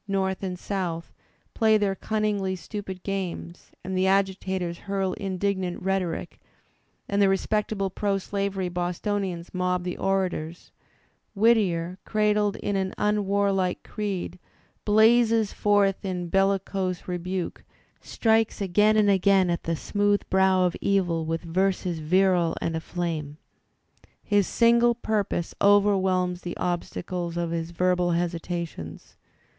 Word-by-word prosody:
North 190 -1 -1
and 185 -2 -4
South, 175 -4 -4 0.4
play 220 -2 +4
their 205 -2 +1
cunningly 205 -2 -1
stupid 190 -1 -7
games, 185 -3 -5
and 190 +1 -4
the 185 +1 +2
agitators 190 -2 0
hurl 195 -2 0
indignant 190 -2 -2
rhetoric, 190 -3 -2 0.7
and 200 0 +1
the 195 - +5
respectable 195 0 0
proslavery 195 -1 -1
Bostonians 180 0 -3
mob 180 -1 0
the 180 0 -3
orators, 180 -4 -2 0.6
Whittier, 190 -5 +2
cradled 210 -1 +1
in 205 - -3
an 190 -1 -1
unwarlike 200 -2 +1
creed, 195 -4 -4 0.5
blazses 225 0 +4
forth 205 -1 +2
in 180 -3 -3
bellicose 195 -1 0
rebuke, 180 0 -4 0.4
strikes 225 -1 +1
again 210 +3 +3
and 210 -1 +4
again 190 -1 +3
at 170 - -3
the 165 - 0
smooth 205 +4 0
brow 190 -1 +4
of 175 - 0
evil 175 -5 +1
with 165 +1 -2
verses 180 0 0
virile 175 +1 +2
and 165 - -2
aflame. 160 -3 -4 0.9
His 205 -2 +2
single 235 0 +4
pur 220 -3 0
pose 170 - -3
overwhelms 190 -3 +3
the 175 - -6
obstacles 175 0 -3
of 170 -1 -1
his 165 -1 -3
verbal 180 0 +1
hesitations. 170 - -4
190 Hz, 120 wpm, -26 LUFS, 175-200 Hz, 0.9 s, the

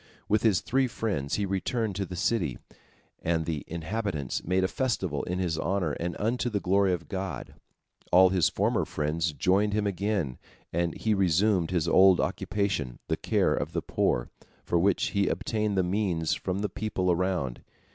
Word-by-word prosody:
With 105 0 +2
his 105 -7 +3
three 135 +1 +1
friends 100 - -2
he 105 - 0
returned 100 +2 -1
to 100 -2 -2
the 90 - -6
city, 85 - 0 0.6
and 80 -1 0
the 80 -3 -3
inhabitants 85 - -3
made 95 +2 +1
a - - +3
festival 95 - -1
in 90 - -2
his 85 -4 -1
honor 95 -4 0
and 85 +4 -3
unto 120 +3 0
the 105 -3 -1
glory 95 0 +2
of 85 -2 -3
God. 95 -9 -5 0.6
All 95 +1 +7
his 90 -4 +3
former - - +1
friends 75 +2 -1
joined 100 +7 +2
him 105 0 +1
again, 100 - -1 0.3
and 85 -1 0
he 110 - +1
resumed 95 -1 +2
his 85 -3 0
old 95 +2 +6
occupation, 95 -12 -1
the - - +2
care - - +1
of - - -3
the - - -2
poor, - - 0 0.4
for 85 - +1
which 95 +1 +2
he 100 -1 +1
obtained 105 -3 -1
the 95 - +3
means 90 -4 0
from 95 +1 -2
the 105 - 0
people 95 -2 -1
around. 85 -8 -1
95 Hz, 175 wpm, -28 LUFS, 85-100 Hz, 0.6 s, All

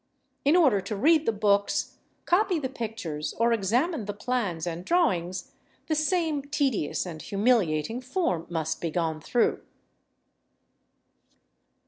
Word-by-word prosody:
In 290 +4 +4
order 270 - +4
to 200 +3 -4
read 315 +8 +3
the - - +4
books, 200 -1 +1 0.3
copy 370 0 +2
the 270 -4 -3
pictures, 215 - -5
or 235 +1 +3
examine 235 - 0
the 205 0 -5
plans 210 -7 -2
and 170 0 -4
drawings, 185 - 0 0.3
the 315 - -1
same 310 -1 +1
tedious 275 - -1
and 160 -3 -7
humiliating 205 -1 +1
form 255 - -1
must 160 -2 -2
be 170 - -1
gone 160 -1 -2
through. 235 +9 +1
220 Hz, 125 wpm, -27 LUFS, 175-285 Hz, 0.3 s, In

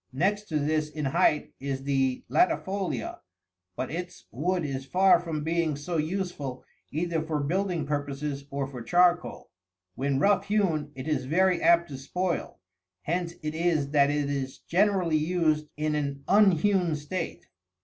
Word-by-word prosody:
Next 200 +10 0
to 155 - 0
this 155 +1 0
in 150 -1 -4
height 150 +1 +2
is 135 -1 -3
the 135 -2 0
latifolia, 195 - 0 0.6
but 130 - -3
its 180 +2 -6
wood 175 +6 -1
is 135 -2 -3
far 185 +6 +4
from 160 -3 -4
being 165 -1 0
so 155 +4 -3
useful 155 -5 -3 0.3
either 165 +1 -1
for 155 -1 -2
building 175 +2 -1
purposes 145 -1 -3
or 140 0 -2
for 130 -3 -8
charcoal. 175 +7 +2 0.4
When 135 +3 -1
rough 200 +8 +3
hewn 170 -8 +1
it 130 +2 -6
is 140 -5 0
very 180 +5 +2
apt 170 0 +5
to 135 -2 -7
spoil, 180 +5 -2 0.5
hence 170 +1 -2
it 155 0 -2
is 160 -4 0
that 140 -1 +4
it 145 -1 0
is 135 -2 -3
generally 185 -3 +2
used 155 -2 +1
in 155 0 0
an 140 -2 -2
unhewn 190 -3 +4
state. 155 +4 -5
155 Hz, 150 wpm, -27 LUFS, 140-180 Hz, 0.6 s, apt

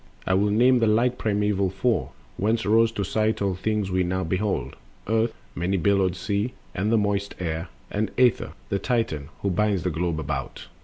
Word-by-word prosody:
I 95 - +1
will 100 +2 +3
name 125 +4 +4
the 115 - +3
like 120 +4 +2
primeval 105 -2 +1
Four, 110 +6 0 0.3
Whence 110 +3 0
rose 115 +2 +4
to 100 - -2
sight 110 +3 0
all 100 -2 0
things 105 +1 -1
we 95 0 +2
now 95 +1 0
behold— 95 +4 -1 0.3
Earth, 110 +1 +1 0.2
many 95 +3 0
billowed 95 0 +2
Sea, 100 +5 -2 0.2
and 100 +4 -1
the 115 - +4
moist 100 -1 0
Air, 80 -1 -3 0.2
And 105 0 0
Aether, 125 -2 +3 0.2
the 100 - 0
Titan, 110 - -1
who 100 - +1
binds 100 -1 +1
the 90 - 0
globe 85 0 -1
about. - - -4
100 Hz, 185 wpm, -25 LUFS, 95-110 Hz, 0.3 s, name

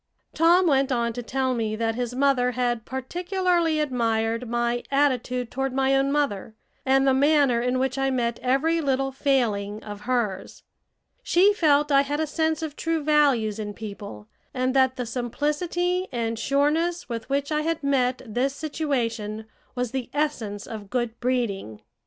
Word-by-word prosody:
Tom 340 +3 +4
went 275 -4 +2
on 235 -2 0
to 245 - -5
tell 260 +2 -1
me 220 -3 -1
that 225 0 -1
his 245 +1 -3
mother 260 -2 +2
had 240 -2 -1
particularly 345 +4 0
admired 230 -4 0
my 240 0 0
attitude 250 -3 0
toward 270 0 -2
my 270 0 +2
own 270 +1 +2
mother, 225 -8 -1 0.3
and 270 +1 +4
the 270 - +4
manner 280 -3 +3
in 250 +1 0
which 265 +1 -1
I 270 0 +1
met 235 -3 -1
every 300 +6 +1
little 270 -2 0
failing 220 -7 0
of 205 -1 -8
hers. 215 -7 -2 0.6
She 400 -3 +4
felt 295 -5 +3
I 275 0 +6
had 290 +2 -2
a 315 - +1
sense 320 +1 -1
of 305 -2 -5
true 330 -2 -1
values 275 -8 +2
in 205 -1 -5
people, 200 - -8 0.3
and 255 0 0
that 260 -1 +3
the 250 - -3
simplicity 300 +10 -1
and 230 -2 -2
sureness 300 +7 +1
with 230 -1 -5
which 280 +2 -1
I 300 0 +1
had 325 0 -2
met 260 -2 +1
this 255 +5 -1
situation 230 -9 -2 0.3
was 250 -2 -2
the 260 -3 -4
essence 230 -9 -2
of 210 -3 -8
good 240 -1 -2
breeding. 225 - -2
260 Hz, 165 wpm, -25 LUFS, 235-290 Hz, 0.6 s, I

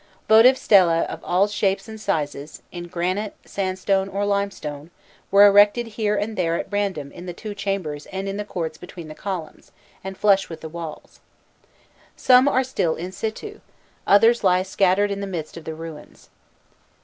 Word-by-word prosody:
Votive 225 +4 +7
stehe 180 -9 +4
of - - -8
all 185 +3 +2
shapes 195 -1 -1
and 220 -1 -9
sizes, 145 -4 -3
in 175 -1 -7
granite, 185 +5 -2
sandstone, 190 0 -1
or 200 +1 -2
limestone, 195 -7 -3 0.4
were 200 +1 +7
erected 205 +3 +5
here 210 -1 -1
and 210 +2 -2
there 170 -3 0
at 195 - -5
random 195 -9 -2
in 175 +1 -10
the 175 - -6
two 215 +2 -7
chambers 195 -8 -4
and 195 +1 -5
in 195 - -3
the 210 - -3
courts 165 -6 -5
between 170 -3 -10
the - - -7
columns, 175 -2 -7 0.3
and 190 0 -7
flush 195 -2 +3
with 165 -1 -9
the 160 - -7
walls. 165 -1 -9 1.0
Some 255 +1 +5
are 265 -2 +2
still 180 -11 -1
in 180 +3 -6
situ, 225 - -6 0.5
others 225 +4 +5
lie 185 -1 +3
scattered 195 +1 +1
in 200 - -3
the 200 - -4
midst 165 -5 -6
of 165 -2 -10
the 160 - -5
ruins. 160 -2 -11
195 Hz, 175 wpm, -22 LUFS, 170-205 Hz, 1.0 s, Votive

